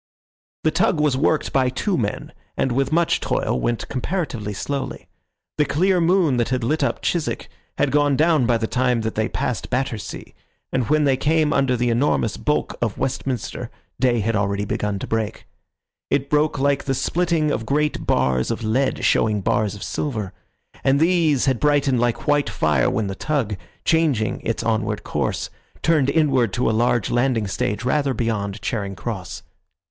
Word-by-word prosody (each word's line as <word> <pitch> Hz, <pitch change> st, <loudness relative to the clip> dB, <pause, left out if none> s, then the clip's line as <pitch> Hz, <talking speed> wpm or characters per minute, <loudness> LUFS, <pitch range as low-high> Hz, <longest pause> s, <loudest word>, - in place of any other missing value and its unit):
The 155 Hz, -, +3 dB
tug 165 Hz, -1 st, +2 dB
was 150 Hz, -3 st, +2 dB
worked 150 Hz, +3 st, +1 dB
by 130 Hz, -2 st, +3 dB
two 180 Hz, +9 st, -1 dB
men, 105 Hz, -8 st, -3 dB, 0.2 s
and 135 Hz, -, +1 dB
with 135 Hz, +3 st, 0 dB
much 170 Hz, +1 st, +2 dB
toil -, -, -1 dB
went 120 Hz, -, -1 dB
comparatively 130 Hz, -, -3 dB
slowly. 140 Hz, +7 st, -4 dB, 0.5 s
The 150 Hz, -, +4 dB
clear 180 Hz, +6 st, +2 dB
moon 165 Hz, -6 st, +3 dB
that 120 Hz, -1 st, +1 dB
had 130 Hz, -2 st, -1 dB
lit 155 Hz, +7 st, +1 dB
up -, -, -1 dB
Chiswick 170 Hz, -3 st, -1 dB, 0.3 s
had 135 Hz, -, +1 dB
gone 145 Hz, 0 st, +3 dB
down 155 Hz, -5 st, +3 dB
by 120 Hz, -2 st, +3 dB
the 115 Hz, -, -2 dB
time 125 Hz, 0 st, +1 dB
that 110 Hz, 0 st, -2 dB
they 110 Hz, +1 st, -1 dB
passed 125 Hz, -, -3 dB
Battersea, 125 Hz, -4 st, -3 dB, 0.4 s
and 130 Hz, -1 st, -1 dB
when 155 Hz, 0 st, +3 dB
they 135 Hz, -2 st, +3 dB
came 155 Hz, +2 st, +2 dB
under 135 Hz, -2 st, +2 dB
the 120 Hz, 0 st, +1 dB
enormous 115 Hz, -3 st, +1 dB
bulk 150 Hz, -, -1 dB
of 115 Hz, -4 st, -1 dB
Westminster 125 Hz, -2 st, -3 dB, 0.3 s
day 120 Hz, -2 st, +2 dB
had 115 Hz, +2 st, 0 dB
already 100 Hz, 0 st, 0 dB
begun 105 Hz, 0 st, -2 dB
to -, -, -5 dB
break. 110 Hz, -2 st, -3 dB, 0.6 s
It 140 Hz, 0 st, 0 dB
broke 150 Hz, 0 st, +2 dB
like 140 Hz, 0 st, +1 dB
the 135 Hz, -, 0 dB
splitting 160 Hz, +2 st, +1 dB
of 110 Hz, -4 st, -2 dB
great 150 Hz, +2 st, 0 dB
bars 65 Hz, -1 st, +1 dB
of 115 Hz, 0 st, -3 dB
lead, 130 Hz, +5 st, 0 dB
showing 105 Hz, -2 st, +2 dB
bars 105 Hz, 0 st, 0 dB
of 100 Hz, -, -8 dB
silver; 110 Hz, -10 st, -3 dB, 0.5 s
and 135 Hz, +1 st, +3 dB
these 165 Hz, -5 st, +3 dB
had 130 Hz, -4 st, +1 dB
brightened 145 Hz, -3 st, +2 dB
like 120 Hz, -1 st, 0 dB
white 145 Hz, -4 st, +2 dB
fire 75 Hz, -9 st, +2 dB
when 110 Hz, -, -1 dB
the 100 Hz, -, -3 dB
tug, 120 Hz, -2 st, -1 dB, 0.3 s
changing 150 Hz, -10 st, +1 dB
its 115 Hz, -, -2 dB
onward 110 Hz, -2 st, -1 dB
course, -, -, -2 dB, 0.3 s
turned 155 Hz, -4 st, +3 dB
inward 140 Hz, -8 st, +2 dB
to 125 Hz, -, 0 dB
a -, -, +3 dB
large 120 Hz, -1 st, +1 dB
landing 120 Hz, -3 st, +1 dB
stage 100 Hz, +3 st, -2 dB
rather 140 Hz, 0 st, +1 dB
beyond 105 Hz, -3 st, -2 dB
Charing 100 Hz, -5 st, -2 dB
Cross. 95 Hz, -4 st, -6 dB
130 Hz, 175 wpm, -22 LUFS, 110-150 Hz, 0.6 s, The